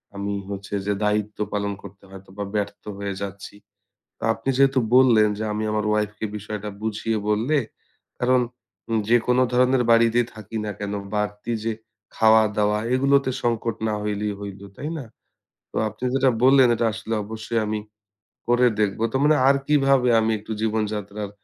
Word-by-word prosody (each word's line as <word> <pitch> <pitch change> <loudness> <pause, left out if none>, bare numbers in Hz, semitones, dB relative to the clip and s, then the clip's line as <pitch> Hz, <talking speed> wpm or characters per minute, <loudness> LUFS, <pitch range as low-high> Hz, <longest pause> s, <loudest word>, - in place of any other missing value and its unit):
আমি 100 0 -3 0.2
হচ্ছে 100 0 -7
যে, 105 - +1
দায়িত্ব 105 0 0 0.2
পালন 100 0 -1
করতে 100 0 -12
হয়তো 95 0 -13
বা 100 - -2
ব্যর্থ 100 0 -3
হয়ে 100 -1 -3
যাচ্ছি। 100 0 -7 0.8
আপনি 115 +5 -2
যেহেতু 135 -1 +4 0.2
বললেন 115 -5 +6
যে, - - -3
আমি 110 +1 -2
আমার 105 0 0
wife 105 -1 0
কে - - -4
বিষয়টা 105 0 -6
বুঝিয়ে 110 0 -1
বললে, 115 +9 +1 0.6
কারণ 125 0 +3 0.7
যেকোন 120 +1 +3
ধরনের 125 +1 +3
বাড়িতে 115 +1 +5
থাকি 110 +1 -8
না 105 - -3
কেন 100 0 -3 0.2
বাড়তি 105 +2 -2
যে, 115 - 0 0.4
খাওয়া 110 0 +6
দাওয়া 105 0 +2 0.2
এগুলোতে 135 0 +3
সংকট 115 -1 -1
না 105 - 0
হইলেই 105 0 -2
হইল, 100 -1 -7 0.2
তাই 150 +3 -5
না? 135 - -6 0.7
তো - - -11
আপনি 115 - -8
যেটা 135 -1 +4
বললেন 130 -1 +6
এটা 115 0 0
আসলে 110 +1 -4
অবশ্যই 110 +1 -3
আমি 105 0 -1 0.7
করে 120 +1 +4
দেখব। 105 0 0
তো - - -5
মানে 150 +1 +5
আর 140 - +6
কিভাবে 135 -4 +3
আমি 110 0 +1
একটু 110 - -10
জীবনযাত্রার 105 -2 -2
110 Hz, 160 wpm, -23 LUFS, 105-125 Hz, 0.8 s, বললেন